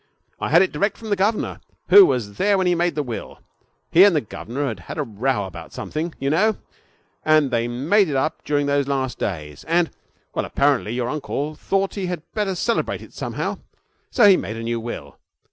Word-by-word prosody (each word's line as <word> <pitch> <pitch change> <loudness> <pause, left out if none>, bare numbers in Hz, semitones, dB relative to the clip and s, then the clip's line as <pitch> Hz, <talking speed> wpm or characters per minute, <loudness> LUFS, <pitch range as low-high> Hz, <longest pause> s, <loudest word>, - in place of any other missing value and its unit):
I - - -2
had 170 +4 +6
it 190 - -1
direct 200 +8 0
from 220 -2 -8
the - - +4
governor, 205 +3 -1 0.3
who 400 -2 +9
was 105 -5 -2
there 200 0 +3
when 190 - +1
he 180 - +3
made 170 -2 0
the 150 - 0
will. 120 -4 -6 0.5
He 175 - +8
and 200 -4 +6
the 150 - +2
governor 120 +5 -5
had 110 -7 -4
had - - -8
a 150 - 0
row 115 -2 -1
about 95 - -10
something, 160 +2 -4
you 135 +1 0
know, 210 +7 +2 0.7
and 155 -3 +3
they 115 -1 +1
made 155 - +2
it 140 - -2
up 145 +4 -1
during 145 -1 0
those 140 -1 +1
last 135 -2 -2
days, 75 -6 -4
and 170 0 +2 0.4
Well, - - -1
apparently 140 -6 +1
your 120 -1 -1
uncle 150 +1 -3
thought 195 +5 -1
he 195 -3 -3
had 175 -3 -4
better 205 -3 -1
celebrate 230 +6 -1
it - - -15
somehow, - - -4 0.5
so 235 -6 +5
he 195 -2 +7
made 110 +3 -5
a 115 - -5
new 115 0 -2
will. 120 +1 -7
150 Hz, 210 wpm, -22 LUFS, 120-185 Hz, 0.7 s, who